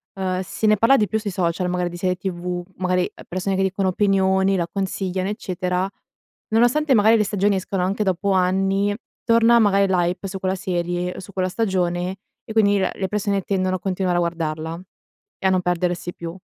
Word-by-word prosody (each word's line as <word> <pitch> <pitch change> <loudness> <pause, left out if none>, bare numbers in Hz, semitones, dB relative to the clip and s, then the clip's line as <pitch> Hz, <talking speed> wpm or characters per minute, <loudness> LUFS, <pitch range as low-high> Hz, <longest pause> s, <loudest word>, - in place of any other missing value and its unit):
ehm, 185 -1 -1
si 190 +3 -4
ne 215 0 +5
parla 230 +7 +5
di 210 - +2
più 220 - -1
sui 215 -1 -3
social 180 0 -1
magari 180 0 0
di 175 - -7
serie 180 +1 0
tv, 180 -1 -3
magari, 180 0 +1
uhm, - - -12
persone 185 +2 -2
che 190 - 0
dicono 190 0 0
opinioni, 190 0 +2
la 170 -2 -1
consigliano 190 -1 -2
eccetera, 185 -2 -2 0.6
nonostante 245 +6 +3
magari 220 0 +5
le 215 - +3
stagioni 200 0 +1
escano 190 0 -2
anche 195 +3 0
dopo 195 0 0
anni, 195 +2 +2 0.3
torna 230 0 +5
magari 200 -2 +4
l' 190 - 0
hype 180 +2 -1
su 190 0 -6
quella 190 0 -1
serie 175 -2 -2
o - - -7
su 190 - -11
quella 185 -1 0
stagione 185 -3 -1 0.3
e - - -10
quindi 205 -2 +4
la 190 - 0
le 190 - -3
persone 200 -1 -1
tendono 185 -1 0
a - - -18
continuare 185 -1 -1
a - - +3
guardarla 165 -1 -3 0.6
e 190 - +1
a - - +3
non 185 -1 +2
perdersi 175 0 -1
più, 170 0 -7
190 Hz, 200 wpm, -22 LUFS, 180-200 Hz, 0.6 s, ne